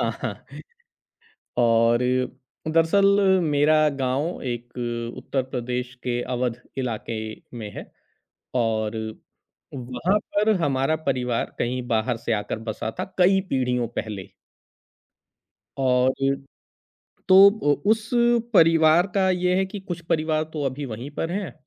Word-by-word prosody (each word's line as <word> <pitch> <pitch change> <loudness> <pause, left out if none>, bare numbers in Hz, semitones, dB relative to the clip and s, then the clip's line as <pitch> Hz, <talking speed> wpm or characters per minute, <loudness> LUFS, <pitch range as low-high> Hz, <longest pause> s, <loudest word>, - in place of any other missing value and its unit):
अ, - - +1
हाँ। - - -2 1.2
और 115 0 +4 0.7
दरअसल 165 +5 +3 0.4
मेरा 150 0 +3 0.2
गाँव 135 +7 -1
एक 120 0 -7 0.4
उत्तर 130 +1 -2
प्रदेश 125 -1 -4
के 120 -1 -1
अवध 120 -1 -2 0.2
इलाके 115 -2 -3 0.4
में 110 -3 -6
है - - -9 0.6
और 110 -2 0 0.8
वहाँ 130 +10 0 0.2
पर 210 +2 +3
हमारा 135 +2 +1
परिवार 125 -3 -1
कहीं 125 +1 -1
बाहर 115 +1 0
से 115 - -2
आकर 105 +1 -3
बसा 110 +1 -3
था - - 0 0.2
कई 190 +2 +5
पीढ़ियों 125 -2 0
पहले। 105 -4 -6 1.6
और 125 0 +3 1.2
तो 185 - +7 0.6
उस 220 0 0 0.4
परिवार 165 0 +5
का 190 -1 +3
ये 180 0 +1
है 190 +1 +2
कि 195 +2 -7
कुछ 175 -3 -6
परिवार 155 -1 +1
तो 150 -2 -3
अभी 135 +2 -3
वहीं 120 +3 -6
पर 165 - -2
हैं 195 -1 -3
130 Hz, 120 wpm, -24 LUFS, 120-165 Hz, 1.6 s, तो